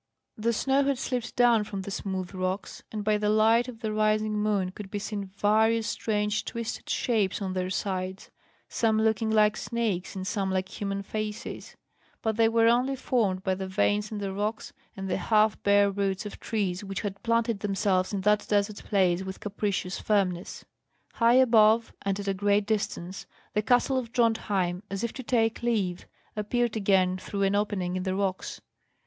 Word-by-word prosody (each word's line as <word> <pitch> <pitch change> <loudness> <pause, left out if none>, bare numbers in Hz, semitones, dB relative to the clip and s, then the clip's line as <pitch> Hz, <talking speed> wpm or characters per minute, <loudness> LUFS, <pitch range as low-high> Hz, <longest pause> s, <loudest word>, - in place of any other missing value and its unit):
The 225 +2 0
snow 270 +4 +2
had 275 -1 +1
slipped 245 -2 -3
down 240 -3 +4
from 200 -2 -5
the 200 - -6
smooth 190 -2 -4
rocks, 185 +1 -3
and 215 -1 -4
by 210 0 +2
the 210 0 +1
light 225 +3 +4
of 235 -2 -9
the 215 -2 -2
rising 215 0 +1
moon 210 -3 0
could 195 0 -9
be 205 - -3
seen 205 0 -4
various 215 +3 +2
strange 210 -1 -1
twisted 230 -1 -5
shapes 215 -6 +1
on 190 -2 -3
their 185 0 -2
sides, 190 0 -3 0.4
some 220 -2 +1
looking 220 0 +1
like 215 -1 +4
snakes, 220 -7 -2
and 190 -1 -4
some 195 -1 -1
like 190 0 -1
human 200 0 -2
faces; 215 +1 -5 0.5
but 220 -1 0
they 225 0 +4
were 230 0 +4
only 250 +3 +3
formed 210 -8 0
by 190 - +1
the 190 0 -4
veins 205 +2 +1
in 215 - -4
the 200 -2 -3
rock 210 +3 -2 0.3
and 195 0 -4
the 185 - 0
half 215 +2 +2
bare 200 0 +4
roots 195 0 -1
of 210 - -7
trees, 200 -4 -2
which 195 -1 -4
had 200 -1 -5
planted 230 -2 +1
themselves 195 -2 0
in 200 -2 -2
that 210 +2 +2
desert 205 0 +1
place 185 -3 +2
with 190 0 -6
capricious 200 -2 -2
firmness. 190 -4 -1 0.5
High 235 +1 +4
above, 225 -3 +5
and 195 0 -1
at 200 - -5
a 195 - +2
great 205 +1 +2
distance, 200 -3 -3 0.3
the 210 - +2
castle 245 +4 +2
of 235 -2 -7
Drontheim, 205 -7 +1
as 195 +2 -4
if 235 - -2
to 260 - -6
take 225 -2 +1
leave, 205 -7 -1 0.3
appeared 230 +2 0
again 190 -3 +2
through 200 +1 -3
an 195 0 +2
opening 200 -3 -1
in 185 - -1
the 185 0 -1
rocks. 190 -1 -2
210 Hz, 185 wpm, -27 LUFS, 195-225 Hz, 0.5 s, above